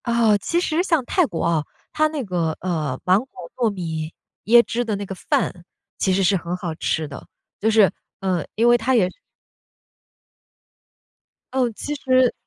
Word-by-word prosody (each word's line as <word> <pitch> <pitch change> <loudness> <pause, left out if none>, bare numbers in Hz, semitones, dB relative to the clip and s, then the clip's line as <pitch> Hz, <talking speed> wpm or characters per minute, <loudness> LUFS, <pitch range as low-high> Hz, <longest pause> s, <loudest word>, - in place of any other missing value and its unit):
啊， 230 -3 +3
其 340 - 0
实 330 -1 +1
像 330 -8 +1
泰 360 +5 +2
国 170 - -4
啊， 165 -3 +1 0.3
它 310 0 +3
那 305 -3 -4
个， 170 -6 -1
呃， 155 -7 -2
芒 185 +2 +5
果 170 - -11
糯 240 -3 +1
米 165 -5 -4 0.3
椰 235 +2 +7
汁 240 +1 -2
的 220 -3 -2
那 200 0 -4
个 190 - -6
饭 180 -1 -1 0.4
其 190 - +2
实 195 +1 +2
是 190 +2 +3
很 175 -1 -3
好 175 -3 -4
吃 160 -1 -1
的， 140 - -10 0.3
就 220 - +2
是， 215 -3 +5 0.3
呃， 185 -4 0
因 230 +2 +3
为 240 0 +6
它 245 +3 +1
也 200 -6 +4 2.5
呃， 260 -2 +2
其 290 +7 -5
实 255 -2 +3
205 Hz, 185 characters per minute, -22 LUFS, 175-245 Hz, 2.5 s, 椰